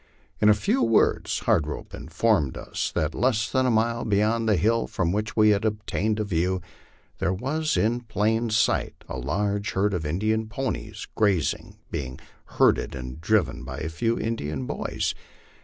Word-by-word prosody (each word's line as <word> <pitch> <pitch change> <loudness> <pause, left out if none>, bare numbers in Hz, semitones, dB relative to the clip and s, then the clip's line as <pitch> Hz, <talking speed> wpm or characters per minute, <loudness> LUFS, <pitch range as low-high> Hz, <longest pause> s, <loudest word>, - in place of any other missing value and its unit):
In 105 - +5
a 105 - +7
few 105 +6 +1
words 115 -2 +2
Hard 75 - +2
Rope 75 - -6
informed 95 - 0
us - - -3
that 75 0 0
less 110 -3 +1
than 130 0 +2
a - - +3
mile 115 +1 +1
beyond 110 +2 +1
the 105 - +4
hill 115 +6 +2
from 85 -2 -1
which 105 +2 -2
he 110 -1 +5
had 105 +1 +1
obtained 110 0 -1
a - - +1
view, 90 -1 0 0.6
there 85 - +1
was 155 +9 -1
in 115 +3 +2
plain 110 +1 0
sight 110 - +1
a - - -5
large 100 - -1
herd 100 +2 +1
of 90 -3 -1
Indian 110 +8 0
ponies 135 +4 -4
grazing, 100 -7 0
being 65 -2 -4 0.4
herded - - +3
and 65 +3 -7
driven 80 -10 +1
by - - -6
a 80 - -3
few 115 +8 0
Indian 75 - -3
boys. - - -2
105 Hz, 170 wpm, -25 LUFS, 85-115 Hz, 0.6 s, a